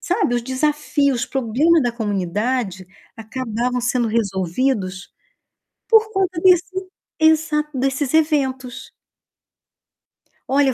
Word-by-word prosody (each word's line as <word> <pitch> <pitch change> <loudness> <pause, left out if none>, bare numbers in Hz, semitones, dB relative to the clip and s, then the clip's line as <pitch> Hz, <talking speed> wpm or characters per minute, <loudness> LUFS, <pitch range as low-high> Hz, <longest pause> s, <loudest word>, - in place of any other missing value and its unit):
sabe, 360 - 0
os 240 - 0
desafios, 280 0 0
os - - -2
problema 275 +6 +2
da 245 -2 0
comunidade 205 -1 -2 0.3
acabavam 240 +2 -3
sendo 240 -1 0
resolvidos 195 -1 -1 0.8
por 445 -1 +4
conta 375 -4 -1
desse 370 +1 +2 0.3
Exato. 315 -1 +2
Desses 270 +1 -1
eventos. 270 -5 0 1.6
Olha, 275 0 +4
eu - - 0
260 Hz, 100 wpm, -20 LUFS, 230-310 Hz, 1.6 s, por